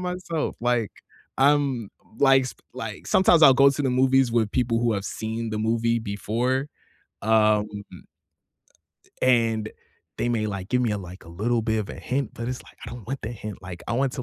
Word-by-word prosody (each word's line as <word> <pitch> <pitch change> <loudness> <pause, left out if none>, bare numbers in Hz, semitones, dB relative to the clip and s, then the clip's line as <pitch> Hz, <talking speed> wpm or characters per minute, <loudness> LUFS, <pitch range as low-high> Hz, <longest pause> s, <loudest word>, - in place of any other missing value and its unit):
myself." 180 -3 -3
Like, 120 -3 +1 0.5
I'm, 135 -6 +2 0.3
like, 135 -1 +5
sp - - -18
like, 80 +5 -7
sometimes 175 - +4
I'll 135 -3 +9
go 140 +1 +6
to 145 +1 -2
the 135 - +1
movies 130 0 +3
with 110 -3 +1
people 120 -1 +1
who 120 -1 +2
have 100 -1 -2
seen 110 +2 -4
the 110 - -3
movie 115 +1 +1
before, 115 +6 -1 0.6
um, 110 -1 +3 1.6
a - - +1
a - - +2 0.3
and 110 -1 -4 0.5
they 120 - 0
may, 110 -3 0
like, 100 -1 -5
"Give 125 0 +1
me 115 - +1
a, 105 - -2
like, 90 0 -10
a - - -14
little 115 +7 -1
bit 110 0 0
of 105 - -3
a - - -7
hint." 135 -1 -2
but 115 +1 -5
it's 130 - -5
like, - - -18
"I - - -7
don't 120 -3 -9
want 135 +2 -4
the 110 - -4
hint, 105 -3 -8
like, 90 -2 -8
I - - -1
want 130 +1 +1
to, 125 - -4
115 Hz, 205 wpm, -25 LUFS, 110-130 Hz, 1.6 s, I'll